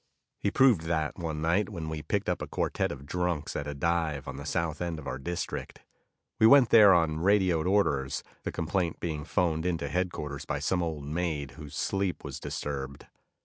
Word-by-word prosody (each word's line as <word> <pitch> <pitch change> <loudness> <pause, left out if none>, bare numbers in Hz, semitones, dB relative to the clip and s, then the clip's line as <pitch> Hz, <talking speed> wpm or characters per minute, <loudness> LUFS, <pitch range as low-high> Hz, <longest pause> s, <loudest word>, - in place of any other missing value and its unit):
He 100 - +1
proved 125 -5 +5
that 80 0 -1
one 80 -2 -3
night 90 +5 +2
when 85 -6 -5
we 80 -1 -4
picked - - -1
up - - 0
a - - -4
quartet - - -1
of 70 - -8
drunks 90 -1 -2
at 70 - -3
a 75 - -4
dive 80 -1 0
on - - -5
the - - -7
south 80 -1 -1
end 85 -2 -2
of 80 - -9
our 65 - -4
district. 85 +6 -4 0.6
We 110 - +7
went 135 -1 +7
there 105 -3 +8
on 80 -3 +3
radioed 90 -3 +3
orders, 70 -9 +1 0.2
the - - -4
complaint 85 +1 -1
being 75 -3 -3
phoned 80 -1 0
into 85 -2 -1
headquarters 75 -6 -2
by - - -2
some 90 -1 0
old 80 -4 -3
maid 75 -3 -2
whose 75 -1 -10
sleep 95 -2 -1
was - - -6
disturbed. 70 -1 -5
80 Hz, 190 wpm, -29 LUFS, 75-90 Hz, 0.6 s, there